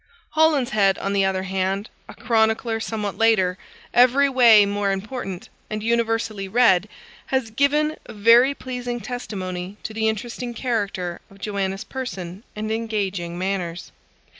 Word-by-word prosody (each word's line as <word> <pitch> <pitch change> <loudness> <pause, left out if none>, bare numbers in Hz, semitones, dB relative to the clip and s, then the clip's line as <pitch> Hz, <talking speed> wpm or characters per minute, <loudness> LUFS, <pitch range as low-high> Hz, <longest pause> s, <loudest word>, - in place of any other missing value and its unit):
Holinshead, 250 -11 +3
on 195 - -2
the 195 -1 +3
other 190 -1 0
hand, 190 +2 -1 0.2
a - - -10
chronicler 225 0 +1
somewhat 215 -3 -4
later, 190 -5 +3 0.3
every 255 +3 +5
way 235 -6 +7
more 200 0 0
important, 195 -2 -5 0.2
and 215 0 -4
universally 225 -3 0
read, 210 -3 +4 0.4
has 260 -4 -1
given 295 +5 +2
a - - -9
very 235 +6 +5
pleasing 245 -2 -5
testimony 195 -5 -5
to 220 - -5
the 220 0 +1
interesting 240 +2 -5
character 200 -8 -2
of 195 - -17
Joanna's 195 -1 -3
person 195 -8 -6
and 215 +1 -3
engaging 200 -6 -2
manners. 185 -2 -3
215 Hz, 135 wpm, -23 LUFS, 195-240 Hz, 0.4 s, way